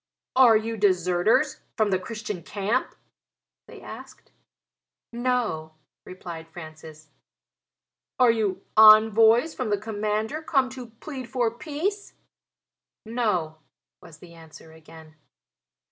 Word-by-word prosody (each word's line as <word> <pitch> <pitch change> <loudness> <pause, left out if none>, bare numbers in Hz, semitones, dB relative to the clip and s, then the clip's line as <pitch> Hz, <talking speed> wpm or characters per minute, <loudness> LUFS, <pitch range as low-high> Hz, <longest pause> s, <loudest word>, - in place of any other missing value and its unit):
"Are 245 -4 +6
you 225 +1 -4
deserters 190 - +1 0.2
from 215 -3 +1
the 185 - +1
Christian 210 -2 -6
camp?" 205 +8 -2 0.7
they - - -13
asked. - - -12 0.8
"No," 235 -11 -2 0.3
replied 170 -3 -9
Francis. 155 -2 -12 1.1
"Are 250 -2 +5
you 205 -4 -2
envoys 220 +5 +6
from 250 -4 -4
the 205 - +1
commander 215 +6 -3
come 270 -5 0
to 255 -2 -9
plead 255 +2 -9
for 240 -2 0
peace?" 350 - -5 0.9
"No," 210 -9 -2 0.4
was 155 - -14
the 170 +1 -15
answer 160 -1 -15
again. 160 0 -16
215 Hz, 105 wpm, -25 LUFS, 175-245 Hz, 1.1 s, Are